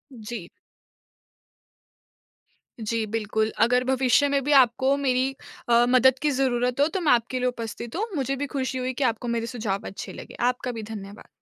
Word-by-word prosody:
जी। 220 Hz, -5 st, -7 dB, 2.3 s
जी, 225 Hz, 0 st, -1 dB
बिल्कुल, 220 Hz, 0 st, -1 dB
अगर 250 Hz, +2 st, +4 dB
भविष्य 260 Hz, +1 st, +3 dB
में 280 Hz, 0 st, +1 dB
भी 290 Hz, -, -1 dB
आपको 265 Hz, +1 st, +4 dB
मेरी 260 Hz, -1 st, +1 dB, 0.4 s
अ, 235 Hz, 0 st, +5 dB
मदद 255 Hz, +1 st, +5 dB
की 300 Hz, -1 st, +2 dB
ज़रूरत 250 Hz, -2 st, 0 dB
हो 290 Hz, -, +5 dB
तो 365 Hz, +3 st, -3 dB
मैं 310 Hz, -, +3 dB
आपके 245 Hz, +1 st, +1 dB
लिए 250 Hz, -, +1 dB
उपस्थित 235 Hz, -1 st, -5 dB
हूँ। 410 Hz, +5 st, 0 dB
मुझे 275 Hz, -1 st, -1 dB
भी 285 Hz, -, -3 dB
खुशी 265 Hz, -1 st, -3 dB
हुई 255 Hz, 0 st, -2 dB
कि 270 Hz, -, -2 dB
आपको 235 Hz, -1 st, 0 dB
मेरे 235 Hz, -1 st, -1 dB
सुझाव 215 Hz, -5 st, -3 dB
अच्छे 195 Hz, -, -7 dB
लगे, -, -, -10 dB
आपका 250 Hz, 0 st, -3 dB
भी 225 Hz, -2 st, -6 dB
धन्यवाद। 200 Hz, 0 st, -9 dB
250 Hz, 175 wpm, -25 LUFS, 230-265 Hz, 2.3 s, अ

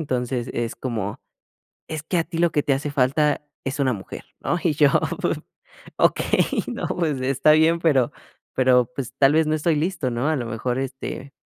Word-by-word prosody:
entonces 125 Hz, -4 st, -2 dB
es 115 Hz, -1 st, -3 dB
como: 115 Hz, -5 st, -4 dB, 0.7 s
"Es 155 Hz, -1 st, -4 dB
que 170 Hz, +4 st, -2 dB
a 165 Hz, -, +2 dB
ti 165 Hz, 0 st, -6 dB
lo 170 Hz, -1 st, +3 dB
que 150 Hz, -, +1 dB
te 140 Hz, -, +2 dB
hace 145 Hz, +2 st, -2 dB
falta 145 Hz, +2 st, +1 dB, 0.2 s
es 135 Hz, +1 st, -4 dB
una 130 Hz, -2 st, +2 dB
mujer, 95 Hz, -3 st, -8 dB
¿no?". 175 Hz, -, -1 dB
Y 165 Hz, -5 st, +2 dB
yo, 145 Hz, -1 st, +5 dB, 1.1 s
okey, -, -, +2 dB
no, -, -, -3 dB
pues 150 Hz, -7 st, -1 dB
está 135 Hz, +3 st, +3 dB
bien, 160 Hz, +2 st, +5 dB
pero 140 Hz, -7 st, +3 dB, 0.4 s
pero, 125 Hz, -2 st, +4 dB
pues 130 Hz, -2 st, -5 dB
tal 135 Hz, +1 st, +5 dB
vez 160 Hz, 0 st, +4 dB
no 155 Hz, -, +1 dB
estoy 155 Hz, +1 st, +1 dB
listo, 155 Hz, -4 st, -1 dB
¿no? 120 Hz, +6 st, 0 dB
A 155 Hz, -, +2 dB
lo 120 Hz, -4 st, -3 dB
mejor, 120 Hz, +3 st, -2 dB
este, 135 Hz, +1 st, -5 dB
140 Hz, 190 wpm, -23 LUFS, 125-155 Hz, 1.1 s, yo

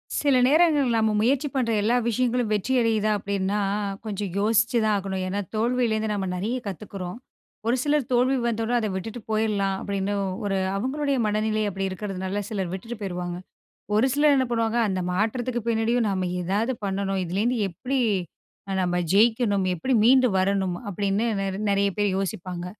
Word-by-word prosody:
சில 285 Hz, -2 st, +2 dB
நேரங்கள் 295 Hz, -3 st, +4 dB
நம்ம 220 Hz, -1 st, +2 dB
முயற்சி 270 Hz, +5 st, +2 dB
பண்ற 245 Hz, -3 st, +1 dB
எல்லா 230 Hz, +4 st, +2 dB
விஷயங்களும் 245 Hz, -1 st, 0 dB
வெற்றியடையுதா 220 Hz, -1 st, +1 dB
அப்டின்னா 200 Hz, 0 st, -1 dB, 0.5 s
கொஞ்சம் 205 Hz, -2 st, -3 dB
யோசிச்சு 225 Hz, +3 st, +2 dB
தான் 215 Hz, -1 st, +2 dB
ஆகணும். 190 Hz, -1 st, -3 dB
ஏனா 200 Hz, +2 st, -2 dB, 0.2 s
தோல்வியிலருந்து 225 Hz, -1 st, +1 dB
நம்ம 195 Hz, -2 st, -2 dB
நிறைய 215 Hz, +8 st, -2 dB
கத்துக்குறோம். 195 Hz, 0 st, -6 dB, 0.5 s
ஒரு 240 Hz, -, +3 dB
சிலர் 295 Hz, -2 st, +1 dB
தோல்வி 255 Hz, +2 st, +3 dB
வந்தோடன 230 Hz, +1 st, 0 dB
அத 220 Hz, -, -1 dB
விட்டுட்டு 225 Hz, +5 st, -5 dB
போயிட்லாம் 210 Hz, -3 st, +1 dB
அப்டின்னு 200 Hz, 0 st, -2 dB, 0.3 s
ஒரு 195 Hz, -1 st, 0 dB, 0.2 s
அவங்களுடைய 275 Hz, +6 st, -1 dB
மனநிலை 215 Hz, +1 st, 0 dB
அப்படி 195 Hz, 0 st, -2 dB
இருக்கிறதுனால, 190 Hz, +1 st, -4 dB
சிலர் 190 Hz, -5 st, -3 dB
விட்டுட்டு 225 Hz, +5 st, -6 dB
போயிருவாங்க. 175 Hz, -2 st, -4 dB, 0.6 s
ஒரு 225 Hz, +5 st, +4 dB
சிலர் 290 Hz, 0 st, +4 dB
என்ன 260 Hz, -, +2 dB
பண்ணுவாங்க. 230 Hz, 0 st, +1 dB
அந்த 185 Hz, -1 st, -1 dB
மாற்றத்துக்கு 235 Hz, +5 st, -1 dB
பின்னாடியும் 230 Hz, +1 st, +1 dB
நம்ம 185 Hz, -2 st, -1 dB
ஏதாவது 205 Hz, +8 st, 0 dB
பண்ணணும். 195 Hz, 0 st, -1 dB
இதுலேருந்து 215 Hz, +8 st, 0 dB
எப்டி 255 Hz, +10 st, -2 dB, 0.7 s
அ -, -, -1 dB
நம்ம 175 Hz, 0 st, 0 dB, 0.2 s
ஜெயிக்கணும். 215 Hz, -2 st, +3 dB
எப்படி 260 Hz, +10 st, -1 dB
மீண்டு 255 Hz, +1 st, +6 dB
வரணும் 190 Hz, -1 st, +1 dB
அப்டின்னு 200 Hz, +3 st, 0 dB
நெர் 195 Hz, 0 st, -3 dB
நெறைய 200 Hz, 0 st, +2 dB
பேர் 205 Hz, -1 st, +2 dB
யோசிப்பாங்க. 180 Hz, -2 st, -4 dB
215 Hz, 150 wpm, -25 LUFS, 195-240 Hz, 0.7 s, மீண்டு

